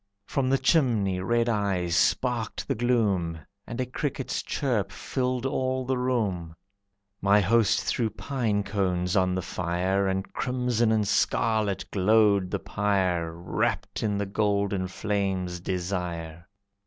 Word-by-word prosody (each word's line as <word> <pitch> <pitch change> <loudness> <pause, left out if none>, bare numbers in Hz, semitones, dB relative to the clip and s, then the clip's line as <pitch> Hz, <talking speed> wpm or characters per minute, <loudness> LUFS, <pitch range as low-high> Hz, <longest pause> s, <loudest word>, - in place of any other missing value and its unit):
From 130 +3 0
the 135 - +4
chimney, 120 - +2
red 115 +5 +1
eyes 100 -6 0
sparked 120 +5 0
the 135 - +1
gloom, 105 -9 +1 0.3
And 120 - -6
a 130 - +1
cricket's 135 +1 -3
chirp 110 -8 -1
filled 125 +4 -2
all 130 -1 -1
the 130 +1 0
room. 100 -10 -1 0.7
My 100 +1 +5
host 110 +2 +3
threw 115 -3 0
pine 110 -2 -1
cones 90 -2 -1
on 95 -1 +2
the 95 - -2
fire 90 +4 0
And 95 0 -2
crimson 125 -3 0
and 110 -2 +2
scarlet 105 -3 +1
glowed 100 -1 +3
the - - -1
pyre 95 -4 0
Wrapped 85 +1 -2
in 105 -2 0
the 100 - -1
golden 100 -2 0
flame's 95 -3 -2
desire. 85 -2 -4
100 Hz, 130 wpm, -27 LUFS, 95-120 Hz, 0.7 s, My